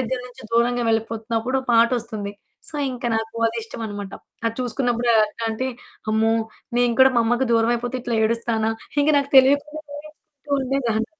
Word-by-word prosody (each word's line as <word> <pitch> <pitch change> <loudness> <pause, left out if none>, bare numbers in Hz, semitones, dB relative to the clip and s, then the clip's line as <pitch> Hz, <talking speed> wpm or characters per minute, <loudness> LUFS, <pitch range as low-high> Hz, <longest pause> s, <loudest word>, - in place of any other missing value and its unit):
దగ్గర 255 +1 -2
నుంచి 250 +1 -14
దూరంగా 240 +1 +2
వెళ్ళిపోతున్నప్పుడు 225 +2 -1
ఓ - - -16
పాటొస్తుంది. 230 -3 +1 0.4
సో, - - -12 0.2
ఇంకా 245 -1 -5
నాకు 225 +1 -4
అది 230 +1 -2
ఇష్టమనమాట. 205 -3 -6 0.3
అది 225 - -1
చూసుకున్నప్పుడు 245 -1 -1 0.2
ఎట్లాంటే, 225 +3 -3 0.4
అమ్మో! 220 +1 +3 0.5
నేను 245 -1 +3
కూడా 265 0 +7
మా 235 - +5
అమ్మకి 240 +3 +1
దూరం 230 +1 +3
అయిపోతే 245 +2 -4
ఇట్లా 240 -2 -1
ఏడుస్తానా? 225 -1 0 0.3
ఇంకా 300 +1 +3
నాకు 280 0 -2
తెలియకుండా 285 +3 +2
ఏడుస్తూ 300 -1 -12
ఉండేదాన్ని. 250 -4 0
235 Hz, 150 wpm, -22 LUFS, 225-260 Hz, 0.5 s, కూడా